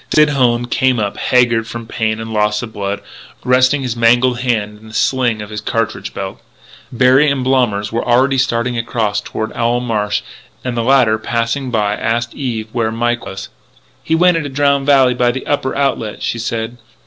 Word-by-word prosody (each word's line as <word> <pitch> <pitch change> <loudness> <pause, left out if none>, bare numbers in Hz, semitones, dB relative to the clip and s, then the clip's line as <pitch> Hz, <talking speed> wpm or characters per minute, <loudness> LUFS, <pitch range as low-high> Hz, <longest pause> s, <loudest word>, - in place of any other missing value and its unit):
Sid 150 -1 +5
Hone 120 -4 +2
came 130 +1 +1
up, 105 -2 -2
haggard 120 -2 +2
from 115 0 -7
pain 110 -1 -2
and 110 0 -6
loss 105 +1 +1
of 110 -2 -8
blood, 100 0 -3 0.4
resting 130 +3 +3
his 125 -2 -2
mangled 120 +1 +3
hand 110 -4 -1
in 110 - -15
the 110 - -11
sling 120 -5 +1
of 105 - -11
his 105 0 -5
cartridge 110 -3 -2
belt. 95 0 -6 0.5
Berry 130 +4 +4
and 140 -2 -1
Blommers 120 -6 +1
were 115 - -1
already 130 +2 +2
starting 120 -1 0
across 110 -3 -1
toward 110 +1 -5
Owl 120 +1 +1
Marsh; 105 -4 -1 0.4
and 125 -2 -2
the 120 - 0
latter, 120 -3 +3
passing 120 +4 -2
by, 105 -3 0
asked 115 +2 -2
Eve 115 -5 -4
where 115 -2 -1
Mike 120 +1 -1
was. 95 0 -7 0.5
"He 160 - +1
went 175 +1 +4
into 150 -3 -3
Drowned 140 0 +1
Valley 135 -3 +5
by 125 0 +2
the 130 +2 -3
upper 145 -2 -1
outlet," 135 -6 -1
she 120 - -2
said. 115 +1 -3
120 Hz, 185 wpm, -16 LUFS, 110-130 Hz, 0.5 s, Sid